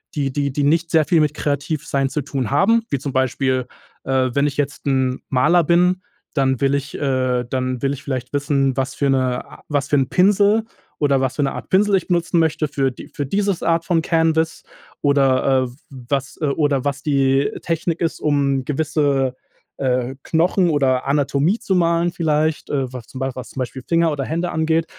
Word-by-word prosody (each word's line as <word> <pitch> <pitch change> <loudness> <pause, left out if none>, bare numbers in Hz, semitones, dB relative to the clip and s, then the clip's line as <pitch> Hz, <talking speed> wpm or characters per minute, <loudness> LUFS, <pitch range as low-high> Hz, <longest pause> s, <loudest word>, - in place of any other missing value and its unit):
die 140 -3 -1
die 140 -1 -1
die 145 - -2
nicht 165 +3 +2
sehr 160 -2 +4
viel 170 - +3
mit 150 -1 +1
kreativ 145 0 -2
sein 135 -1 0
zu 150 +3 -2
tun 135 -3 -3
haben, 225 +11 +3
wie 140 - -1
zum 140 +1 -4
Beispiel, 130 0 0 0.4
äh, 130 -1 +1
wenn 140 +2 +2
ich 140 - -4
jetzt 145 -1 -2
'n 130 -2 0
Maler 170 +7 +3
bin, 180 +3 +3 0.3
dann 130 -3 +1
will 140 0 +2
ich 140 0 -4
äh, 130 -3 0
dann 130 -1 -2
will 135 - +1
ich 140 - -8
vielleicht 130 -2 -4
wissen, 140 -2 +1
was 135 0 -1
für 140 - 0
'ne 130 -2 +1
a - - -15
was 145 -2 0
für - - +3
'n 135 -2 +1
Pinsel, 205 +3 +4 0.4
oder 140 -3 +2
was 130 -1 -1
für - - +1
'ne 135 - -1
Art - - -8
Pinsel 200 +1 +3
ich 190 - 0
benutzen 175 -1 +1
möchte 160 -1 +1
für 135 -2 0
die 125 - -11
für 145 - -4
dieses 200 +4 -1
Art 165 0 +2
von 170 -3 +2
Canvas 160 -1 +1 0.4
oder, 135 -2 +3
äh, - - -6 0.4
was 135 -1 -2
äh, - - +1
oder 140 -2 0
was 140 -1 -1
die 135 -1 +2
Technik 165 0 -1
ist, 165 - -1
um 140 -3 +1
gewisse, 140 -3 0 0.4
äh, 130 -1 0
Knochen 175 +2 +2
oder 135 -4 +1
Anatomie 145 +6 +1
zu 195 - -1
malen 170 0 +2
vielleicht, 155 -2 0
äh, 135 -3 -1
was 125 -3 -8
zum 130 - -9
Bei 135 0 -1
was 130 -1 -7
zum - - -8
Beispiel 130 +1 -5
Finger 165 -1 +2
oder 140 -2 -2
Hände 170 +4 -2
angeht. 160 +1 +1
140 Hz, 200 wpm, -20 LUFS, 135-160 Hz, 0.4 s, sehr